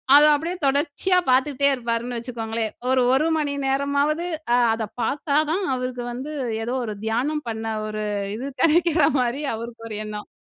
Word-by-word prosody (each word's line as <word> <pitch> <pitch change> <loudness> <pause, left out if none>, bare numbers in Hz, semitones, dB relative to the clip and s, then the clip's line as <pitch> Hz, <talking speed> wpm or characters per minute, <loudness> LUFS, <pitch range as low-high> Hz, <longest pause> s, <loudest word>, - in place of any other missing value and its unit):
அத 295 - +9
அப்பிடியே 330 +5 -3
தொடர்ச்சியா 290 +6 +1
பார்த்துட்டே 275 +1 +3
இருப்பாருன்னு 240 -1 -2
வச்சுக்கோங்களேன்! 225 -2 -3 0.2
ஒரு, 260 0 +4
ஒரு 285 +4 +3
மணி 290 -2 -1
நேரமாவது 280 +4 +1 0.3
அ - - +4 0.2
அத 225 0 -2 0.2
பார்த்தாதான் 305 +7 +1
அவருக்கு 255 -1 -3
வந்து 265 +5 -6 0.3
ஏதோ 240 - -2
ஒரு 215 - -4
தியானம் 275 +7 0
பண்ண 220 0 -4 0.2
ஒரு 215 0 -4 0.3
இது 250 +5 -5 0.2
கிடைக்கிற 335 +1 +4
மாரி 250 +3 0
அவருக்கு 230 0 -8
ஒரு 215 - -5
எண்ணம். 210 0 -6
265 Hz, 150 wpm, -23 LUFS, 230-295 Hz, 0.3 s, அத